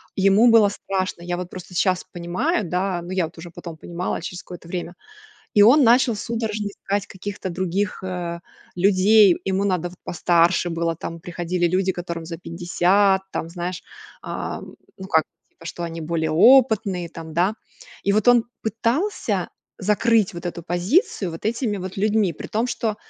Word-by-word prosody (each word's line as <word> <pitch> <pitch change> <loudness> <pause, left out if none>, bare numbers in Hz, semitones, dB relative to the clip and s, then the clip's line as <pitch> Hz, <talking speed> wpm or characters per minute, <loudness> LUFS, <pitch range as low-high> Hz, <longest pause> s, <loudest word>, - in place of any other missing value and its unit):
ему 195 +5 +5
было 225 -3 +6
страшно. 190 -3 -3
Я 175 0 -3
вот 180 0 -6
просто 180 -1 -9
щас 185 0 +1
понимаю, 180 - -1
да, 180 +1 -1
ну 175 - -8
я 185 -2 +1
вот 165 +1 -12
уже 170 +1 -9
потом 165 -1 -9
понимала 175 +3 -4
через 180 +1 -6
какое-то 175 -2 -11
время. 175 0 -5 0.6
И 205 - +7
он 260 +7 +7
начал 240 0 +4
судорожно 220 -1 -3
искать 200 0 -3
каких-то 200 0 -6
других, 185 +3 -2
э, 175 -2 -4 0.3
людей. 195 +1 +5
Ему 190 +1 0
надо 180 -3 0
вот 180 - -16
постарше 175 +1 +2
было, 165 0 -1
там 170 +1 -7
приходили 175 0 -1
люди, 190 +2 +1
которым 170 -2 -5
за 165 0 -7
50, 180 +3 +2
там 165 - -4
знаешь. 175 +1 -5 0.4
Ам, - - -6 0.2
ну 190 - -8
как 160 -4 +4
бы - - -62 0.4
что 175 - -5
они 165 0 -5
более 160 0 -1
опытные 205 -3 +4
там, 160 -1 -9
да. 180 +5 +2 0.5
И 200 - +2
вот 215 0 +1
он 240 -2 +6 0.2
пытался 230 - -1 0.3
закрыть 210 0 +2
вот 170 - -8
эту 170 -1 -5
позицию 180 - +1
вот 165 - -9
этими 225 -1 -1
вот 185 +1 -6
людьми. 210 -2 +2
При - - -9
том, 225 +3 0
что 225 -3 -2
185 Hz, 170 wpm, -22 LUFS, 175-205 Hz, 0.6 s, И